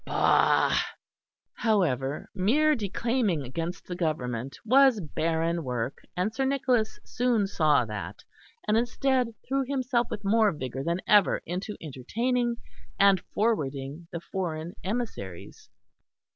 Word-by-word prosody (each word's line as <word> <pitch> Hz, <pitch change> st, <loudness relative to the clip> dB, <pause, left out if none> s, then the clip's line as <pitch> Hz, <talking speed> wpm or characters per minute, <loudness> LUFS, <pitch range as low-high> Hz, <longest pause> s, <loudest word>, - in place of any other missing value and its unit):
Bah!" -, -, +3 dB, 0.8 s
However 150 Hz, -, 0 dB
mere 265 Hz, +11 st, +3 dB
declaiming 220 Hz, -, 0 dB
against 165 Hz, +8 st, -5 dB
the 180 Hz, -, -5 dB
Government 135 Hz, -7 st, -2 dB
was 260 Hz, -1 st, +5 dB
barren 165 Hz, 0 st, -1 dB
work, 125 Hz, -1 st, -3 dB, 0.2 s
and 195 Hz, +4 st, 0 dB
Sir 270 Hz, -, -1 dB
Nicholas 260 Hz, -5 st, +1 dB
soon 240 Hz, -4 st, +1 dB
saw 155 Hz, -9 st, +3 dB
that; 100 Hz, -4 st, -6 dB, 0.4 s
and 210 Hz, -, +3 dB
instead, 255 Hz, +1 st, +1 dB, 0.2 s
threw 270 Hz, +1 st, +1 dB
himself 255 Hz, -2 st, 0 dB
with 205 Hz, -, -5 dB
more 215 Hz, +1 st, +4 dB
vigour 130 Hz, -2 st, -5 dB
than 170 Hz, +4 st, -1 dB
ever 205 Hz, -2 st, +4 dB
into 185 Hz, +5 st, -4 dB
entertaining 235 Hz, -, -1 dB, 0.4 s
and 195 Hz, -1 st, +5 dB
forwarding 150 Hz, -7 st, -1 dB
the 170 Hz, -, -4 dB
foreign 170 Hz, -2 st, -4 dB
emissaries. 190 Hz, -, -5 dB
190 Hz, 115 wpm, -27 LUFS, 150-235 Hz, 0.8 s, was